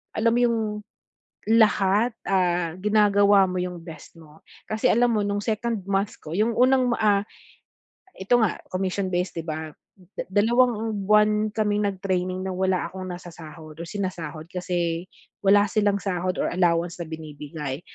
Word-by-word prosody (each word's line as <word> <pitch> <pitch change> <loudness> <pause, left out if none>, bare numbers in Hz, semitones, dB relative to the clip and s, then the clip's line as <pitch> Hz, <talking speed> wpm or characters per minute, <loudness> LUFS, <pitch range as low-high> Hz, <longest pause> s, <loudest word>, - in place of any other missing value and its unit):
alam 225 +1 +2
mo - - +2
yung 235 -2 +2 0.9
lahat 220 0 +3
ah, 175 -3 +1
ginagawa 205 -1 +4
mo 180 - -2
yung 180 -2 -5
best 165 -2 -11
mo. 160 -1 -16 0.3
Kasi 215 0 +1
alam 240 +1 +3
mo 215 - +1
nung 205 0 -1
2nd 225 -1 -2
month 200 +2 0
ko, 155 - -8
yung 220 +2 +1
unang 255 -1 +4
ma - - +1
ah, 205 -2 +3 1.0
ito 200 +6 +2
nga 205 - +1
commission-based 185 -1 -2
'di - - -9
ba? 155 0 -5 0.6
2 225 -1 +2
buwan 210 0 +3
kaming 210 -1 0
nag-training 185 -1 -2
na - - -2
wala 185 -2 0
akong 185 +1 -8
nasasahod 160 -3 -11
o 170 - -5
sinasahod. 170 -5 -5
Kasi 175 -2 -2 0.4
wala 205 +1 +5
silang 205 0 +1
sahod 185 -1 -2
or - - 0
allowance 175 -1 +1
na 170 - -4
binibigay. 150 -2 -6
190 Hz, 145 wpm, -24 LUFS, 175-210 Hz, 1.0 s, wala